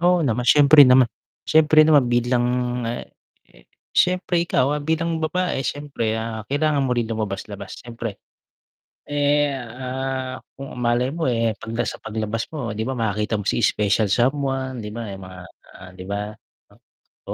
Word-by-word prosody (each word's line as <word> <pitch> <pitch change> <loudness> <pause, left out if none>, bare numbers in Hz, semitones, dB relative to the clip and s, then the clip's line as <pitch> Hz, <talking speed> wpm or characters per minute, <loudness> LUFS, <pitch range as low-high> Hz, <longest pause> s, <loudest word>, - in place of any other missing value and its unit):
Oo 175 -1 +3
naman. 120 -2 -1
Siyempre 145 -1 +8
naman 125 -1 +6 0.4
siyempre 155 0 +5
naman 150 -4 +5
bilang, 120 0 +1 0.4
ah, 120 +1 -3 0.5
eh, - - -22 0.3
siyempre 180 -1 +2
ikaw, 135 -3 +2
ah, 150 - -1
bilang 160 +2 -1
babae 180 0 -1
siyempre, 140 -7 -2
ah, 110 -1 -5
kailangan 145 +1 +1
mo 125 - +1
rin 115 -1 -1
lumabas-labas, 105 -2 -5
siyempre. 115 -3 -6 0.9
Eh, 145 0 +2
ah, 130 +1 -4 0.2
kung 135 0 -8
malay 120 +2 +1
mo, 165 -2 -1
eh, 115 -2 +1
'pagka 115 +1 -3
sa - - -4
paglabas 110 0 -3
mo, 135 -8 -4
'di 110 - -4
ba, 130 - -2
makikita 105 -1 -1
mo 105 - -4
si - - +1
special 105 0 +2
someone, 130 +2 0
'di 105 - -6
ba 115 -3 -5
yung 95 - -9
mga, 90 0 -11 0.3
ah, 90 0 -12
'di 90 - -10
ba, 100 0 -2 1.1
o - - -1
125 Hz, 160 wpm, -22 LUFS, 110-145 Hz, 1.1 s, Siyempre